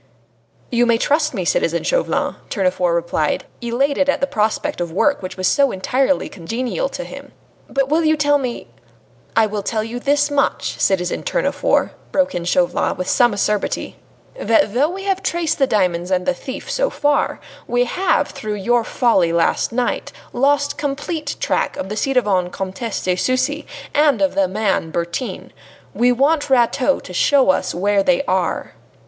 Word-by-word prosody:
"You 240 0 +3
may 235 -1 +4
trust 300 +3 +1
me, 185 -4 -2
citizen 170 0 +1
Chauvelin," - - 0
Tournefort 185 -3 +1
replied, 165 -3 -1 0.2
elated 275 +4 +1
at - - +2
the - - +2
prospect 215 -7 -1
of 170 -1 -3
work 280 - +1
which 185 0 -7
was 185 -1 0
so 280 -1 +3
entirely 265 +8 0
congenial 245 - -3
to - - -5
him. - - -11 0.4
"But 275 -1 0
will 315 +4 +2
you 310 0 +3
tell 290 0 +3
me 250 -3 -4 0.4
" - - -34 0.3
"I 225 - +5
will 210 -1 -3
tell 215 +2 -2
you 230 +2 -5
this 290 +2 +1
much, 285 -1 0
citizen 180 -2 +1
Tournefort," - - 0 0.2
broke 280 -1 +1
in 170 -1 -3
Chauvelin 175 0 +1
with 185 0 -3
some 240 -2 +4
acerbity, 205 0 -1 0.4
"that 220 -2 +2
though 280 +6 +2
we 385 +2 -6
have 390 -1 0
traced 335 -4 -1
the 270 - +4
diamonds 180 -5 0
and 185 -1 0
the 275 - +2
thief 260 -1 -8
so - - +1
far, 290 -1 0 0.3
we 245 0 +2
have, 360 +10 +1
through 210 -1 -5
your 235 +4 +1
folly 220 -9 +2
last 170 0 +1
night, 245 +1 -1 0.2
lost 285 +3 +1
complete 290 +3 -3
track - - -1
of 190 - -4
the 210 - -3
ci 270 +5 0
devant 195 -8 +1
Comtesse 195 +5 -4
de 180 -1 +1
Sucy 260 +8 -1 0.3
and 290 -5 +3
of 195 -1 +1
the 195 -1 +2
man 195 -4 -1
Bertin. 170 +9 -4 0.4
We 245 +1 +3
want 285 +4 +2
Rateau 260 +2 +2
to 180 - -11
show 265 +3 +4
us - - -2
where 200 +3 +2
they 270 +5 +2
are." 185 - -1
240 Hz, 175 wpm, -19 LUFS, 190-285 Hz, 0.4 s, I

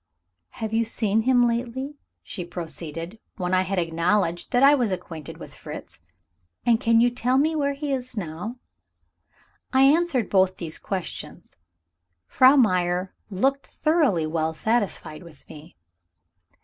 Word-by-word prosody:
"Have 220 -1 -5
you 230 +1 +3
seen 220 -1 0
him 245 0 +4
lately?" 255 +5 -3 0.2
she 180 - -6
proceeded, 170 +2 -6 0.2
when 180 0 -2
I 185 - +4
had 190 +1 -2
acknowledged 170 +1 0
that 245 +2 +3
I 280 +1 +8
was 245 -7 +1
acquainted 165 -5 -6
with - - -11
Fritz. - - -10 0.7
"And 230 -2 +4
can 230 -2 +4
you 245 0 +4
tell 250 +2 0
me 315 +3 +2
where 280 -2 0
he 285 0 -3
is 255 -2 -5
now?" 180 +5 -5 1.2
I 265 0 +4
answered 285 -4 +3
both 190 -1 +2
these 160 -3 -4
questions. 190 -3 -6 0.7
Frau 260 - +5
Meyer 185 -6 +2 0.2
looked 270 +8 0
thoroughly 300 - +1
well 160 0 -1
satisfied 205 -7 -1
with 170 -5 -16
me. 155 +3 -13
215 Hz, 140 wpm, -24 LUFS, 175-255 Hz, 1.2 s, I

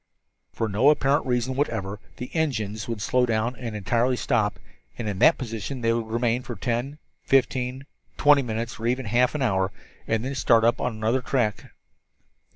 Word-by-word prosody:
For 115 - -2
no 110 +7 +4
apparent 140 -2 +2
reason 125 +1 0
whatever 105 -8 -2 0.2
the 125 - -7
engines 110 -10 -1
would 115 -3 -4
slow 125 -1 +2
down 115 +2 0
and 115 -4 -5
entirely 120 +5 +1
stop, 110 -6 0 0.4
and 115 - -4
in 100 -2 -3
that - - +6
position 115 +1 -5
they 115 0 +2
would 115 -1 -2
remain 120 +2 0
for 125 - -7
ten, 125 +4 -2 0.2
fifteen, 130 0 +1 0.3
twenty 145 -1 +5
minutes 115 -1 -4
or 115 - -2
even 125 +1 0
half 120 +6 +2
an 145 - 0
hour, 95 -5 +1 0.4
and 115 +1 0
then 135 - -3
start 115 -2 +3
up 115 +1 +3
again - - 0
on 120 - -3
another 110 +4 0
tack. 120 -6 -1
120 Hz, 180 wpm, -25 LUFS, 110-130 Hz, 0.4 s, that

